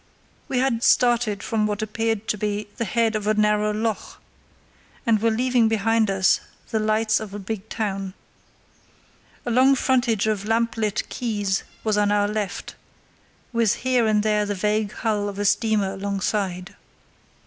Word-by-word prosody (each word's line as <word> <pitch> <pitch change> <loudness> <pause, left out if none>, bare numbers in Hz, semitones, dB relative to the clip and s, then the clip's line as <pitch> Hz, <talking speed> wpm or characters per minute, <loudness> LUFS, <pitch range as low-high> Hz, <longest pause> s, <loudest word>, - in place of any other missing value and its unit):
We 260 - -2
had 250 -3 +1
started 240 -5 +3
from 215 -2 0
what 210 0 -2
appeared 225 0 -2
to - - +2
be 210 0 -3
the 230 - -1
head 230 0 +1
of 210 -1 -2
a 215 - +3
narrow 210 0 +2
loch, 220 0 -3 0.9
and 225 -3 +3
were 230 - +3
leaving 245 +1 +2
behind 220 0 +2
us 190 -1 +3 0.3
the 220 - +1
lights 215 0 +2
of 210 -2 -7
a - - -3
big 210 +1 -6
town. 195 -3 -3 1.3
A 240 - -1
long 260 +3 +5
frontage 245 -5 +1
of 215 -2 0
lamp 230 +1 +1
lit 215 -2 -1
quays 205 -5 -1 0.2
was 215 -1 +1
on 205 0 +2
our 205 0 +2
left, 210 -3 -4 0.8
with 230 -3 +2
here 250 -3 +3
and 210 -1 +2
there 210 -1 +2
the 205 - -2
vague 210 +1 0
hull 210 -3 -1
of 200 - -8
a 205 - -1
steamer 205 -2 +2
alongside. 195 -1 -2
215 Hz, 160 wpm, -23 LUFS, 205-225 Hz, 1.3 s, long